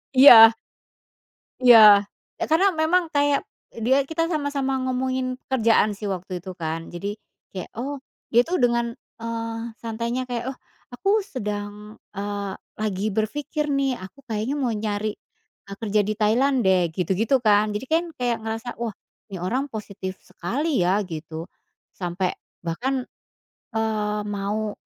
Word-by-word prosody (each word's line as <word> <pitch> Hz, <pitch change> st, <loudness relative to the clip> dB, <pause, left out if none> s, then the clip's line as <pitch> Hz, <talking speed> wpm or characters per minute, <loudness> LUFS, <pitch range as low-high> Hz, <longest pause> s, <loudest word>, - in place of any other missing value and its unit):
Iya. 230 Hz, -4 st, +10 dB, 1.1 s
Iya, 215 Hz, -4 st, +9 dB, 0.4 s
ya -, -, -1 dB
karena 350 Hz, +5 st, +5 dB
memang 350 Hz, +3 st, +3 dB
kayak 285 Hz, -1 st, +3 dB, 0.5 s
dia 270 Hz, +3 st, +4 dB
kita 330 Hz, +1 st, 0 dB
sama-sama 285 Hz, -3 st, -1 dB
ngomongin 255 Hz, 0 st, -1 dB
kerjaan 225 Hz, -4 st, +3 dB
sih 210 Hz, +1 st, -5 dB
waktu 185 Hz, 0 st, -6 dB
itu 190 Hz, -, -6 dB
kan. 160 Hz, 0 st, -2 dB
Jadi 200 Hz, +4 st, -4 dB, 0.4 s
kayak, 185 Hz, -2 st, -6 dB
oh, 280 Hz, +4 st, -3 dB, 0.4 s
dia 235 Hz, -, +5 dB
itu 345 Hz, -, -6 dB
dengan, 235 Hz, -1 st, +2 dB, 0.3 s
eee, 230 Hz, 0 st, -3 dB, 0.2 s
santainya 235 Hz, +2 st, -3 dB
kayak, 240 Hz, -2 st, -3 dB
"Oh, 265 Hz, -, -13 dB, 0.4 s
aku 375 Hz, +11 st, -2 dB
sedang, 210 Hz, -, -6 dB, 0.2 s
eee, 200 Hz, 0 st, -3 dB, 0.3 s
lagi 210 Hz, -1 st, -1 dB
berpikir 295 Hz, +7 st, -1 dB
nih, 275 Hz, -2 st, +1 dB
aku 190 Hz, +9 st, -11 dB
kayaknya 225 Hz, +4 st, -2 dB
mau 255 Hz, -4 st, 0 dB
nyari, 210 Hz, 0 st, -2 dB, 0.6 s
eee, 200 Hz, -, -7 dB
kerja 215 Hz, -2 st, +1 dB
di 210 Hz, +2 st, -1 dB
Tailan 250 Hz, +6 st, +3 dB
deh," 185 Hz, -2 st, +3 dB
gitu-gitu 190 Hz, -, +1 dB
kan. 210 Hz, 0 st, +4 dB
Jadi 210 Hz, +5 st, -4 dB
kan 325 Hz, +3 st, +2 dB, 0.2 s
kayak 240 Hz, -2 st, 0 dB
ngerasa, 225 Hz, +2 st, -4 dB
"Wah, 235 Hz, -1 st, -2 dB, 0.4 s
ini 190 Hz, -, -5 dB
orang 250 Hz, +11 st, -1 dB
positif 200 Hz, -3 st, -6 dB
sekali 275 Hz, -, -2 dB
ya," 185 Hz, +3 st, +2 dB
gitu, 160 Hz, 0 st, -7 dB, 0.5 s
sampai 180 Hz, 0 st, -2 dB, 0.3 s
bahkan, 250 Hz, +11 st, -2 dB, 0.7 s
eee, 215 Hz, -1 st, 0 dB
mau 205 Hz, +1 st, -2 dB
225 Hz, 140 wpm, -24 LUFS, 205-260 Hz, 1.1 s, Iya